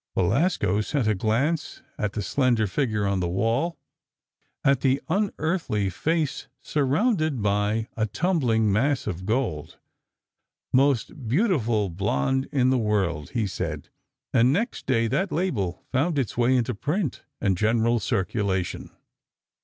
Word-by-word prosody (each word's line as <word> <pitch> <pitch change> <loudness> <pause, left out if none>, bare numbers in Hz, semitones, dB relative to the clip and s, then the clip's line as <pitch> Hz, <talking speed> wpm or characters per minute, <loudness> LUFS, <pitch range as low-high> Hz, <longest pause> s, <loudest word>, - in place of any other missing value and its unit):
Belasco 105 - +2
sent 125 +1 -1
a 110 - +3
glance 125 - -1
at 105 -1 -2
the 105 - -3
slender 120 0 +2
figure 105 -1 -1
on 100 -1 +1
the 90 - 0
wall, 115 - 0 0.9
at 135 -2 +3
the 135 0 +2
unearthly 160 - 0
face 160 - -1
surrounded 155 - +1
by 105 +2 +1
a 110 0 0
tumbling 115 - +1
mass 135 +6 +1
of 95 +2 -4
gold. 110 - -2 1.0
"Most 130 -1 +1
beautiful 120 - +1
blonde 100 - 0
in 130 -3 +3
the 130 - +2
world," 95 -9 0
he 110 - +1
said, 85 -6 -4 0.4
and 125 +1 +5
next 225 - -2
day 115 -3 +2
that 140 - 0
label 110 - -1
found 145 +5 +1
its 130 -6 -1
way 120 +2 +3
into 125 0 +1
print 150 - -2 0.2
and 95 -2 +1
general 115 +4 +2
circulation. 95 -2 -1
115 Hz, 130 wpm, -25 LUFS, 105-145 Hz, 1.0 s, and